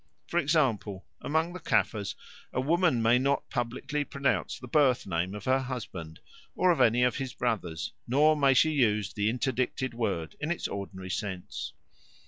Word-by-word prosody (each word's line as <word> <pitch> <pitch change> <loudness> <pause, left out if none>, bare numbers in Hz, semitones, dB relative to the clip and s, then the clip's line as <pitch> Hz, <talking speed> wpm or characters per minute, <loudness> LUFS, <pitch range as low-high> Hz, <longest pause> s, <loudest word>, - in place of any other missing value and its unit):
For 175 - 0
example, 130 - +1 0.2
among 160 +3 0
the 180 - -6
Caffres 110 - 0 0.4
a - - -1
woman 155 -3 +2
may 115 +2 +5
not 140 +2 0
publicly 130 +5 -2
pronounce 140 -1 -1
the 125 - -10
birth 135 -2 +3
name 90 +1 -2
of 105 - -8
her 130 +1 +3
husband 105 -11 -6 0.4
or 185 0 +4
of 170 - +1
any 120 +2 +4
of 125 - +2
his 135 -2 -4
brothers, 95 -9 -2
nor 150 +5 +4
may 140 -3 +4
she 155 +5 +5
use 105 -8 +1
the 105 0 +1
interdicted 130 +1 -1
word 100 -9 -2
in 150 - -3
its 175 - -1
ordinary 95 -2 -6
sense. 90 -8 -4
125 Hz, 165 wpm, -29 LUFS, 100-140 Hz, 0.4 s, may